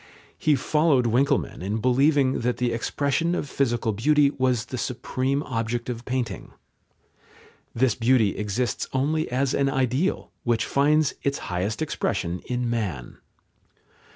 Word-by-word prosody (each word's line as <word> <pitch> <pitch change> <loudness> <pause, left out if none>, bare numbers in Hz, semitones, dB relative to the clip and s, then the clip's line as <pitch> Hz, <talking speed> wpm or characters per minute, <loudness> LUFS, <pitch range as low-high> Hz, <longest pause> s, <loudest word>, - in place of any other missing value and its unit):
He 150 - +3
followed 150 -1 +2
Winckelmann 135 - +1
in 100 +4 -2
believing 135 +3 +3
that 125 +1 -1
the 125 -1 0
expression 140 +8 0
of 145 - -3
physical 120 -5 0
beauty 140 +7 +3
was 130 -4 0
the 125 +1 -5
supreme 130 +3 -2
object 120 -1 -3
of 120 0 -7
painting. 125 -6 -3 1.2
This 125 +1 +3
beauty 115 -3 +2
exists 105 +4 -2
only 155 +4 0
as 130 +2 0
an 140 0 +2
ideal, 135 +6 0
which 120 -2 +1
finds 150 +1 +2
its 140 0 0 0.2
highest 100 - -1
expression 100 - -2
in 125 -1 -1
man. 100 - -3
125 Hz, 130 wpm, -25 LUFS, 115-140 Hz, 1.2 s, He